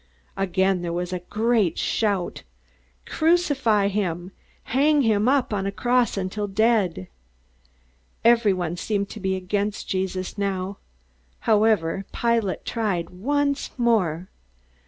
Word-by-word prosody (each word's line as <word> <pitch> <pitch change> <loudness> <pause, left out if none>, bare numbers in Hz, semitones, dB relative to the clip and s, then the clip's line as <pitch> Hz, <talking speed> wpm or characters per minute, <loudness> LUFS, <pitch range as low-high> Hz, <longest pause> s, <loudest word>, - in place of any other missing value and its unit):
Again 190 -1 +1
there 175 -1 -3
was 175 +1 -3
a 180 - -2
great 210 -1 0
shout: 200 -5 -1 0.6
"Crucify 290 - +2
him! 185 -3 -2 0.3
Hang 285 +3 +3
him 215 -1 +2
up 265 -4 +1
on 195 -1 -1
a - - -1
cross 245 +3 +1
till 205 +2 -3
he 195 - -12
is - - -20
dead!" 210 - +2 1.2
Everyone 200 -8 +3
seemed 200 +2 -2
to 220 - -8
be 190 -1 -1
against 200 +3 -2
Jesus 185 +1 -3
now. 195 -1 -2 0.6
However, 210 -5 +2
Pilate 230 -5 0
tried 200 -7 -2
once 280 +9 -1
more. 185 -8 +1
205 Hz, 120 wpm, -24 LUFS, 185-230 Hz, 1.2 s, Hang